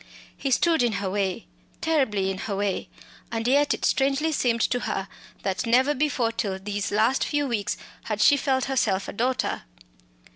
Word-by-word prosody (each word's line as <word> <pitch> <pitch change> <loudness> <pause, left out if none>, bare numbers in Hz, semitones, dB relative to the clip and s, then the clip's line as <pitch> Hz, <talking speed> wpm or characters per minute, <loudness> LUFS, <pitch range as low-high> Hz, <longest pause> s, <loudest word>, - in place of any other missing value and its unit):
He 275 - -3
stood 325 +3 +3
in 240 -2 +2
her 200 -1 -2
way 195 -2 -1 0.3
terribly 215 -12 +1
in 190 - -5
her 200 - -3
way 200 -1 -2 0.4
and 225 0 -2
yet 285 +3 +3
it - - -3
strangely 275 +4 +2
seemed 240 -5 +1
to 245 - +1
her, 195 -4 -3 0.4
that 195 +3 -1
never 260 +5 +4
before 280 -5 0
till 200 -4 -2
these 200 +1 -3
last 220 +6 +2
few 290 -1 0
weeks 215 -6 -1 0.3
had 215 -1 -2
she 250 +7 +6
felt 265 -2 0
herself 210 -8 0
a - - -6
daughter. 250 +4 -1
235 Hz, 175 wpm, -25 LUFS, 200-270 Hz, 0.4 s, she